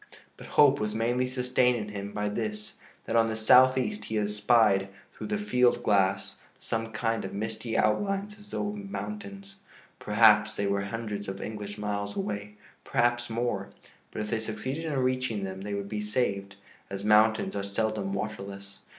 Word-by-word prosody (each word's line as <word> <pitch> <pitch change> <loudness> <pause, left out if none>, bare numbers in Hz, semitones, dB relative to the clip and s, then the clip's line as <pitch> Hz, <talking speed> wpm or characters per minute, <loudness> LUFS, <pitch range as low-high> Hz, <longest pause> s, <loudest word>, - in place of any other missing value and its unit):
But - - -12
hope 140 -1 +7
was 105 0 -2
mainly 120 +3 +1
sustained 125 -1 +2
in 105 -2 -5
him 100 -1 -6
by 105 0 -2
this, 105 0 -4 0.3
that 115 - -2
on 115 -1 +5
the 110 - -2
southeast 130 - +4
he 110 - -2
espied 105 -1 +3 0.2
through - - -7
the 210 0 -1
field 125 -12 +2
glass 95 -1 +1 0.2
some 115 0 -3
kind 115 0 -1
of 95 - -6
misty 110 +2 -3
outlines 200 - 0
as 205 0 -15
though 205 - -2
of 210 - -5
mountains. 200 -1 -7 0.4
Perhaps 105 0 +5
they 100 - -1
were 100 0 0
hundreds 105 -1 -4
of 95 0 -5
English 105 -1 -6
miles 100 -1 -3
away, 105 - -4 0.3
perhaps 120 0 +1
more. 115 -4 -2 0.4
But - - -5
if 105 - -6
they 115 - +1
succeeded 125 +8 -4
in 150 -3 -2
reaching 130 -5 0
them, 95 0 -5
they 100 +1 -4
would 100 0 -4
be 105 +1 -3
saved, 100 -3 -1 0.3
as 100 0 -5
mountains 110 +1 +4
are 100 - -1
seldom 100 0 -2
waterless. 100 -1 -6
110 Hz, 170 wpm, -28 LUFS, 100-125 Hz, 0.4 s, hope